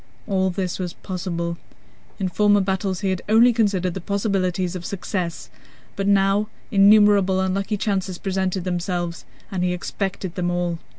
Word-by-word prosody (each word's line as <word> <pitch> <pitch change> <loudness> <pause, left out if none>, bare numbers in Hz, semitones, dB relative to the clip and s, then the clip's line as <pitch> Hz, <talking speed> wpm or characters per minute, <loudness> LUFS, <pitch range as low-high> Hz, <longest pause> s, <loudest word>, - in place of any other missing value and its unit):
All 190 -2 +1
this 185 -1 -3
was 180 -2 -3
possible. 170 -2 -4 0.6
In 195 - -1
former 205 +3 +3
battles 190 0 -1
he 195 -2 +1
had 185 - -2
only 235 +3 +6
considered 195 -5 +1
the 190 - -5
possibilities 185 -2 -1
of 180 - -5
success, 180 -2 -4 0.4
but 195 0 -2
now 200 +1 +3 0.2
innumerable 200 -2 +5
unlucky 195 +3 -1
chances 190 -3 -1
presented 190 -1 -1
themselves, 175 -1 -3 0.3
and 185 -2 -1
he 180 0 +1
expected 190 0 -4
them 175 -1 -1
all. 175 -1 -1
190 Hz, 145 wpm, -22 LUFS, 180-200 Hz, 0.6 s, only